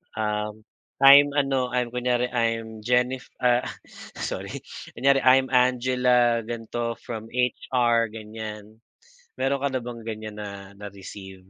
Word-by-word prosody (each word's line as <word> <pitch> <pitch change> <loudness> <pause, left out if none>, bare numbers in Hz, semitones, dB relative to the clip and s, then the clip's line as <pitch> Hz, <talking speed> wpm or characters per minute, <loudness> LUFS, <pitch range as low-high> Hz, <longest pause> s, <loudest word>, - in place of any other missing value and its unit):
"Um, 105 0 -3 0.4
"I'm 140 +1 +8
ano, 135 -3 +1
I'm 125 -1 0
kunyari, 125 0 0
I'm 115 -2 -1
Jennif-" 125 +1 0
Ah, 125 0 +3 0.5
sorry. - - -5 0.3
Kunyari, 135 +3 +3
"I'm 130 +1 +5
Angela 125 -1 +3
ganito 115 0 -4
from 115 -1 -6
HR" 120 -2 +1
ganyan. 110 0 -9 0.6
Mayro'n 135 0 0
ka 140 - +1
na 130 - -1
bang 120 -1 -7
ganyan 110 -1 -6
na 100 -1 -8
na-received? 95 -1 -10
120 Hz, 120 wpm, -25 LUFS, 110-125 Hz, 0.6 s, I'm